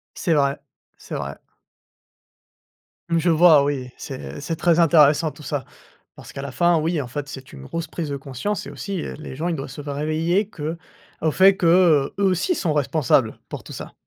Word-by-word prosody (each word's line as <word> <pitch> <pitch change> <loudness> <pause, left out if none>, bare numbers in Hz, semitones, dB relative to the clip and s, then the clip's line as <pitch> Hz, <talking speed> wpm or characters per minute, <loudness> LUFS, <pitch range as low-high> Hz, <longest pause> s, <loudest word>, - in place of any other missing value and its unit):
C'est 170 - 0
vrai, 140 -2 +1 0.4
c'est - - -8
vrai. 70 0 -5 1.7
Je 170 +1 +2
vois, 160 -3 +6
oui. 135 -3 -2
C'est 70 +1 -7
c'est 165 - -3
très 170 0 +2
intéressant 155 -1 +5
tout 150 - -14
ça, 145 -3 -3 0.5
parce - - -12
qu'à 140 - -6
la 140 -1 -6
fin, 175 +5 +3
oui, 160 +1 0
en 130 - -5
fait, 145 +3 -5
c'est 135 -3 -10
une 65 - -11
grosse 165 - -4
prise 165 -3 -4
de 140 - -3
conscience 140 - -4
et - - -7
aussi, 195 -3 -5
heu, - - -6
les 155 - -8
gens, 160 +6 -2
ils 170 - -1
doivent 135 -1 -6
se 145 +3 -8
faire 140 -1 -5
réveiller 165 +7 0
que 160 -3 -5 0.4
au 160 - +1
fait 195 +3 +6
que, 175 - 0
heu, 165 -5 +4
eux, 200 - +3
aussi, 190 - +2
sont 170 - -1
responsables 145 -5 +1
pour - - -7
tout - - -10
ça. - - -8
155 Hz, 205 wpm, -22 LUFS, 140-170 Hz, 1.7 s, vois